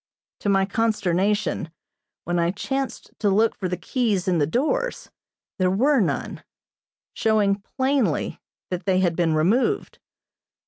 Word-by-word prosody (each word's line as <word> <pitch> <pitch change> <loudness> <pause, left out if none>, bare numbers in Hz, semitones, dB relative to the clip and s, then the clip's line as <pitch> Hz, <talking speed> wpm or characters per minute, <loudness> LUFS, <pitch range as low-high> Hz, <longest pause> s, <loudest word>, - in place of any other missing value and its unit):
To 205 - -1
my 195 -1 +3
consternation, 205 -4 0 0.5
when 175 +1 -1
I 170 0 +2
chanced 270 +8 -3
to 210 - +2
look 215 +3 +3
for 185 -3 -4
the 180 - -2
keys 205 0 -1
in 180 -3 +2
the 145 - +2
doors, 300 - -1 0.5
there 185 -1 +3
were 260 +9 +3
none, 195 - -2 0.7
showing 205 -2 +2 0.2
plainly 260 - 0 0.3
that 180 0 -3
they 185 -1 +3
had 175 -3 +1
been 165 -2 +1
removed. 235 - +1
200 Hz, 135 wpm, -24 LUFS, 180-230 Hz, 0.7 s, my